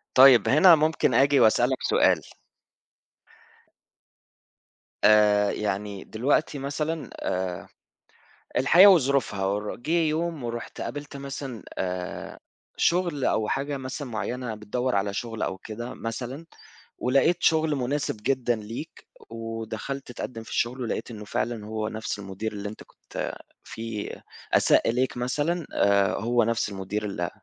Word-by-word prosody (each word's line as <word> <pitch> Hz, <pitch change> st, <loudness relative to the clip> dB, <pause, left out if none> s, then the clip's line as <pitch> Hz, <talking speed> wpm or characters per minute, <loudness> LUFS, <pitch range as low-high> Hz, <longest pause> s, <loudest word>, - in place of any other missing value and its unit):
طيب، 130 Hz, -2 st, +8 dB
هنا 165 Hz, +5 st, +8 dB
ممكن 155 Hz, +1 st, +1 dB
آجي 140 Hz, +1 st, +4 dB
وأسألك 110 Hz, -, +4 dB
سؤال؟ -, -, +4 dB, 2.8 s
آآ 105 Hz, -1 st, +5 dB
يعني 100 Hz, -1 st, -3 dB
دلوقتي 140 Hz, +5 st, 0 dB
مثلًا 150 Hz, +3 st, -3 dB
آآ 90 Hz, -2 st, -3 dB, 0.9 s
الحياة 175 Hz, +10 st, +7 dB
وظروفها 140 Hz, -, +3 dB
ور 105 Hz, +2 st, -2 dB
جه 135 Hz, +7 st, -5 dB
يوم 160 Hz, -1 st, -1 dB
ورُحت 120 Hz, 0 st, -5 dB
قابلت 145 Hz, -1 st, -6 dB
مثلًا 135 Hz, -3 st, -6 dB
آآ 90 Hz, -1 st, -4 dB, 0.4 s
شُغل 170 Hz, -6 st, +1 dB
أو 110 Hz, -, +1 dB
حاجة 140 Hz, +3 st, -2 dB
مثلًا 130 Hz, +2 st, -5 dB
معيّنة 120 Hz, +1 st, -3 dB
بتدوّر 125 Hz, +4 st, -2 dB
على 100 Hz, 0 st, 0 dB
شُغل 115 Hz, +1 st, -4 dB
أو 95 Hz, -, -2 dB
كده 115 Hz, +5 st, -7 dB
مثلًا 125 Hz, +7 st, -5 dB, 0.5 s
ولقيت 140 Hz, +7 st, +3 dB
شُغل 160 Hz, -2 st, +3 dB
مناسِب 135 Hz, -1 st, -2 dB
جدًا 125 Hz, -2 st, +1 dB
ليك 115 Hz, +9 st, -8 dB, 0.2 s
ودخَلت 115 Hz, +3 st, -5 dB
تقدِّم 115 Hz, -1 st, -6 dB
في -, -, -13 dB
الشغل 125 Hz, +2 st, -1 dB
ولقيت 120 Hz, 0 st, -3 dB
إنّه 105 Hz, -1 st, -8 dB
فعلًا 110 Hz, +1 st, -2 dB
هو 110 Hz, 0 st, -3 dB
نفْس 110 Hz, -1 st, -4 dB
المدير 100 Hz, +2 st, -5 dB
اللي 105 Hz, 0 st, -5 dB
أنت 110 Hz, -, -10 dB
كنت -, -, -6 dB, 0.3 s
في 110 Hz, -2 st, -5 dB, 0.4 s
أساء -, -, +4 dB
إليك 125 Hz, +2 st, 0 dB
مثلًا 145 Hz, +7 st, -1 dB
آآ 100 Hz, -2 st, +3 dB
هو 120 Hz, +2 st, +2 dB
نفْس 115 Hz, -1 st, 0 dB
المدير 100 Hz, +2 st, -4 dB
ال 90 Hz, -4 st, -3 dB
120 Hz, 125 wpm, -26 LUFS, 105-140 Hz, 2.8 s, طيب